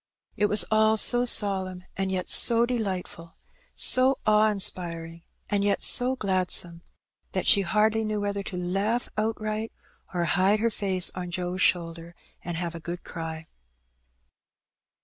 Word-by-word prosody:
It 210 - +1
was 210 0 +4
all 220 0 +3
so 245 +3 +5
solemn, 190 -5 0
and 190 0 -3
yet 185 -1 -3
so 235 0 +4
delightful, 190 -8 -5 0.4
so 255 +1 +3
awe 215 0 +3
inspiring 170 -4 -1 0.3
and 200 -1 -1
yet 200 -1 0
so 255 +1 +4
gladsome, 185 -5 -1 0.5
that - - -2
she 200 - +6
hardly 215 +4 +1
knew 215 -1 -3
whether 200 0 -3
to 190 -2 -6
laugh 195 +7 -2
outright, 215 0 -3 0.4
or 175 -2 -2
hide 195 +4 +1
her 230 +1 0
face 190 -4 0
on 180 -1 -6
Joe's 180 +1 -4
shoulder 170 -1 -1 0.3
and 170 -1 -5
have 170 -1 -4
a 170 - -8
good 175 +2 -7
cry. 160 -1 -7
195 Hz, 145 wpm, -25 LUFS, 175-215 Hz, 0.5 s, she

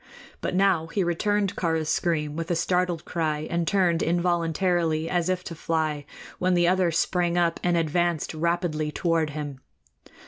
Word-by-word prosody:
But - - -2
now 185 -4 +3
he 190 +3 -1
returned 200 +3 0
Kāra's 160 -3 0
scream 155 -3 0
with 165 0 -4
a 175 - +1
startled 180 0 0
cry, 155 -3 -1
and 170 -1 0
turned 180 -4 +2
involuntarily 170 -1 +1
as 175 0 0
if 185 0 -1
to - - -6
fly, 155 -2 -1 0.3
when 180 0 +2
the 175 -1 +3
other 185 -1 +3
sprang 175 +1 +1
up 170 -1 +1
and 175 -1 +2
advanced 165 0 0
rapidly 160 -2 -1
toward 165 -1 0
him. 145 -2 -6
170 Hz, 160 wpm, -25 LUFS, 160-180 Hz, 0.3 s, now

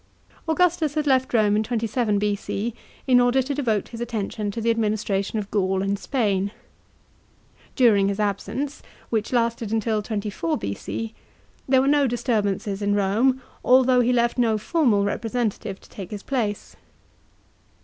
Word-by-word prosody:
Augustus 320 -2 +2
had 305 -1 0
left 260 -2 +2
Borne 215 -3 +3
in 215 - +2
27 225 -1 0
B.O. 205 +2 -1 0.3
in 255 -2 +5
order 245 +2 +3
to 280 +3 -3
devote 230 -8 -1
his 230 -1 -8
attention 215 -2 -3
to 205 - -4
the 230 +1 +2
adminis 215 -2 -1
tration 195 +1 -1
of 205 -2 -4
Gaul 190 -2 +1
and 200 0 -1
Spain. 205 -7 0 1.3
During 215 -7 +4
his 200 +1 -2
absence, 210 +8 -2 0.3
which 220 -2 -1
lasted 230 -3 0
until 220 -1 0
24 205 -6 -2
BXX, 105 +2 -5 0.6
there 260 -1 +5
were 270 - +1
no 285 -1 +4
disturbances 210 -5 -1
in 205 0 +1
Rome, 230 +7 +2 0.2
although 255 0 +5
he 245 +1 +2
left 240 0 +1
no 225 -3 +3
formal 230 - +2
representative 215 -2 -2
to - - -19
take 195 -4 -8
his 205 -1 -7
place. 220 -7 -3
220 Hz, 150 wpm, -24 LUFS, 205-250 Hz, 1.3 s, in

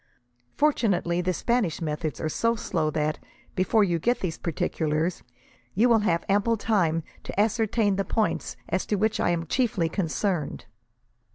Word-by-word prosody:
Fortunately, 195 - +2
the 180 +1 0
Spanish 215 -2 0
methods 155 -1 -3
are - - -1
so 230 +9 +1
slow 165 -7 -1
that, 155 0 -1 0.3
before 190 +4 +3
you 175 -4 +1
get 240 +9 +1
these 170 -3 -3
particulars, 160 +1 -1 0.5
you 225 +6 +4
will 230 -2 +5
have 170 -5 0
ample 205 +3 +2
time 175 -8 +1 0.2
to - - -5
ascertain 220 -1 +2
the 195 - +1
points 215 +3 -1
as 185 +2 -1
to 210 - +1
which 215 +2 +1
I - - +2
am 170 -1 0
chiefly 195 - 0
concerned. 175 -1 -2
185 Hz, 155 wpm, -26 LUFS, 165-220 Hz, 0.5 s, will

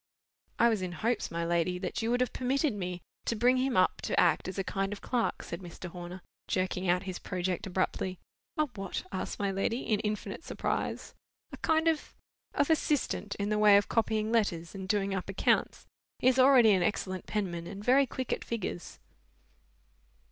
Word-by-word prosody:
"I 235 - +5
was 220 -4 +1
in 180 -1 -3
hopes, 225 +7 -1
my 170 0 -2
lady, 170 +1 +1
that 180 +5 -3
you 225 - -1
would 245 +1 +2
have 250 - 0
permitted 270 +2 +1
me 180 -3 -4 0.2
to 230 - 0
bring 245 +4 +4
him 260 -2 +1
up 185 - +3
to - - 0
act 175 0 +3
as 185 - -5
a 195 - 0
kind 195 +1 -2
of 205 - -5
clerk," 245 -2 -1
said 170 - -6
Mr. 180 0 -8
Horner, 175 +1 -8 0.2
jerking 185 0 -1
out 180 +2 +2
his 185 -2 -5
project 180 0 -2
abruptly. 185 0 -1 0.4
"A 305 - +3
what?" 195 -3 -4
asked 185 - -3
my 200 -1 0
lady, 210 +6 -1
in 215 -2 0
infinite 210 +4 -3
surprise. - - -3 0.4
"A - - -8
kind 320 +1 +2
of—of 300 -2 -2
assistant, 295 -9 0
in 205 0 -2
the 210 0 +1
way 210 -1 +8
of 205 - +1
copying 220 -1 +1
letters 175 -8 0
and 190 -1 -6
doing 200 -2 +1
up 190 0 -3
accounts. 195 - +1 0.3
He - - +1
is 255 0 +4
already 255 -4 +7
an 190 -2 +3
excellent 185 -2 -1
penman 175 -5 -2
and 200 +2 -7
very 270 +2 +5
quick 260 0 -3
at - - -4
figures." 210 -6 -4
200 Hz, 190 wpm, -30 LUFS, 185-235 Hz, 0.4 s, way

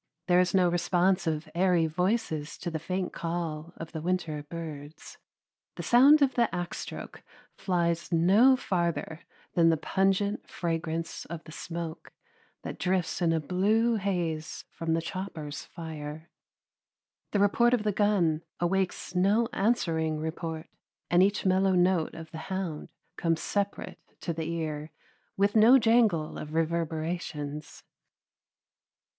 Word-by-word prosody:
There 180 -1 +4
is 180 +1 +2
no 185 -2 +5
response 175 +1 +1
of 155 +1 -1
airy 175 -1 +3
voices 160 -2 -1
to 175 - -5
the 160 - -3
faint 185 +3 -3
call 165 -1 -4
of 165 - -8
the 160 -2 -5
winter 170 -3 -1
birds. 150 -1 -9 0.6
The - - -6
sound 280 +5 +6
of 270 - +2
the 235 -2 +2
axe 175 -1 -4
stroke - - -8 0.3
flies 170 -2 -1
no 195 +11 +5
farther 170 -5 -2 0.3
than 165 -1 +5
the 165 - +3
pungent 195 +5 0
fragrance 165 -1 -3
of 170 -1 -7
the - - -12
smoke 165 0 -6 0.5
that - - -6
drifts 180 -1 0
in 170 -2 +3
a 165 - +2
blue 215 +9 +2
haze 175 -6 -2
from 165 -1 -1
the 165 - -1
chopper's 170 -5 -6
fire. 160 -1 -8 1.0
The - - 0
report 235 +5 +4
of 220 - -3
the 210 - +1
gun 190 -6 +2 0.2
awakes 185 +1 -1
no 205 +6 +3
answering 165 -8 +1
report, 160 0 -4 0.4
and 175 +1 +5
each 200 +2 +2
mellow 190 0 +3
note 180 -2 +2
of 160 -1 -9
the 160 - -7
hound 185 -5 -4 0.3
comes 165 -1 +1
separate 200 -1 -3 0.2
to 170 - -2
the 160 0 -4
ear, 155 -2 -3 0.5
with 200 +2 +2
no 225 +4 +8
jangle 225 -10 +2
of 155 +1 -7
reverberations. 160 -2 -3
170 Hz, 140 wpm, -28 LUFS, 160-195 Hz, 1.0 s, no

